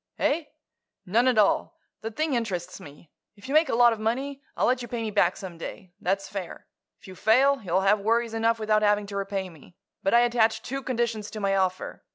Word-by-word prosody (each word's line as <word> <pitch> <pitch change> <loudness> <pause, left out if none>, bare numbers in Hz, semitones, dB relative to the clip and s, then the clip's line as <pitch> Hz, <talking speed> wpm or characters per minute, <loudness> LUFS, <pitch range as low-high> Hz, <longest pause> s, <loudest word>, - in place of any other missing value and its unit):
"Eh? 305 +2 +1 0.6
None 230 +7 +2
at 250 -3 +3
all. 210 -2 +2 0.2
The 225 - -4
thing 310 +6 -2
interests 185 -7 -3
me. 145 +2 -14 0.2
If 200 +2 -13
you 275 - -3
make 310 -1 +4
a - - +1
lot 240 0 +6
of 220 - -7
money, 265 +6 -2 0.2
I'll - - +2
let 250 0 +2
you 240 - -6
pay 240 0 -4
me 220 - -3
back 190 -3 +2
some 180 -4 -9
day. 175 +1 -8
That's 195 +2 -1
fair. 195 -3 -7 0.3
If - - -16
you 190 - -9
fail, 260 +8 +3
you'll 185 -1 0
have 200 +2 +3
worries 230 +2 0
enough 225 0 +1
without 215 -1 +1
having 210 0 +2
to 200 0 -8
repay 195 -1 -2
me. 170 0 -16 0.3
But 195 +4 +2
I 235 - +7
attach 225 -2 +2
two 270 +3 -4
conditions 235 -4 -2
to 215 - -7
my 195 -1 +1
offer. 185 -1 -2
215 Hz, 220 wpm, -26 LUFS, 195-240 Hz, 0.6 s, I